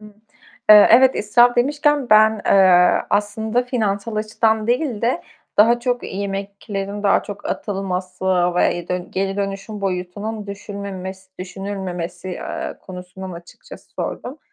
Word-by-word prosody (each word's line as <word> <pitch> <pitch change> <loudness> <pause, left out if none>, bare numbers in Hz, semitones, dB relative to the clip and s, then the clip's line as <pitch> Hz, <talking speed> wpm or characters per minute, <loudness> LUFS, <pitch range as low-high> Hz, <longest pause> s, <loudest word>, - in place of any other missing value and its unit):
Hıı. 210 -1 -14 0.6
Eee, 210 -1 +10
evet 255 +3 +6
israf 240 +4 +4
demişken 290 0 +1
ben, 215 0 +5
eee, 185 -2 +5
aslında 220 +3 0
finansal 220 -3 -2
açıdan 220 0 0
değil 245 -2 -1
de, 245 +8 0 0.3
daha 235 +3 +5
çok 245 0 -1
yemeklerin 200 +1 -5
daha 200 - +3
çok 205 -1 -8
atılması 190 -2 -4 0.3
ve 175 - +2
y 180 +1 -3
geri 195 +1 -2
dönüşüm 200 +1 -4
boyutunun 200 +3 -4
düşünmemes 195 -2 -7
düşünülmemesi, 185 -1 -6
eee, 180 - -5
konusunu 185 0 -9
açıkçası 170 0 -14
sordum. 270 +5 -5
200 Hz, 120 wpm, -20 LUFS, 190-220 Hz, 0.6 s, Eee